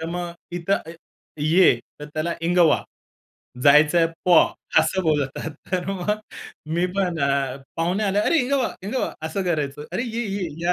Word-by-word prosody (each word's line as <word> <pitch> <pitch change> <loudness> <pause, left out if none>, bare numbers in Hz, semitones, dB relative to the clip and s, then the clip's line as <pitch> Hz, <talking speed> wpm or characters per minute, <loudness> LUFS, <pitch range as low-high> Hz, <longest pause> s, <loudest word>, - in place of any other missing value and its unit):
तर 160 - -4
मग 175 0 -4 0.3
इथं 175 +3 -1
अ, 165 - -7 0.5
ये, 160 +1 +5 0.3
तर 150 - -6
त्याला 160 +2 -1
इंगवा, 170 -2 +3 0.8
जायचंय 150 +4 +6 0.2
पॉ 175 -3 +7 0.4
असं 190 - 0
बोलतात. 150 -2 -1 0.2
तर 180 -2 -1
मग 195 +1 -2 0.6
मी 175 +1 +2
पण 180 -4 0
अ, 140 -1 0 0.2
पाहुणे 180 +6 0
आले, 200 +1 +1
"अरे, 310 +10 +3
इंगवा, 265 0 +1
इंगवा." 235 +7 -2
असं 190 +5 -2
करायचो, 150 -4 -2
"अरे, - - -1
ये, 235 -1 -3
ये, 195 -3 -3
या. 175 - +2
175 Hz, 155 wpm, -23 LUFS, 155-195 Hz, 0.8 s, पॉ